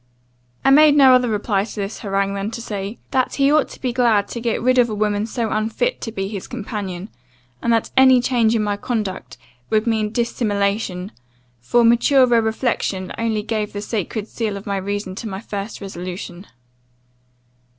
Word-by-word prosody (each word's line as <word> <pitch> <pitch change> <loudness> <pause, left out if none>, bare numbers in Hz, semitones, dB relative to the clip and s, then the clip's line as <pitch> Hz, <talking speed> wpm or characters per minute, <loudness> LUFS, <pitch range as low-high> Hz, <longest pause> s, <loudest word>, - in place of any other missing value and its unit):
"I 270 - +6
made 300 +1 +7
no 270 -3 +7
other 250 -1 +3
reply 205 -2 0
to 215 - -8
this 205 0 -4
harangue, 195 -2 -1
than 200 +1 -3
to 230 - -6
say, 205 -1 -5
'That 260 -2 +1
he 275 0 +3
ought 305 -1 +3
to - - -12
be 250 -2 -2
glad 230 -5 +3
to 235 - -5
get 230 -1 0
rid 255 +1 +3
of 240 -1 +4
a 215 - -3
woman 210 0 0
so 230 -1 -2
unfit 225 - -1
to 225 - -4
be 195 -3 -3
his 200 -2 -6
companion 205 -5 -5 0.5
and 235 - +1
that 230 -1 +1
any 260 -1 +7
change 240 -2 +2
in 220 - +1
my 205 -1 -1
conduct 210 -4 -4 0.3
would 215 0 +2
be 230 - +2
mean 215 -1 -1
dissimulation; 205 -4 -1 0.5
for 235 - +2
maturer 240 +1 +4
reflection 220 -4 -2
only 220 -2 -1
gave 215 -1 -3
the 205 - -4
sacred 215 0 -3
seal 215 -4 -3
of 195 - -10
reason 200 0 -3
to 220 +3 -6
my 190 -1 -5
first 205 0 -6
resolution. 180 0 -7
215 Hz, 180 wpm, -20 LUFS, 200-235 Hz, 0.5 s, made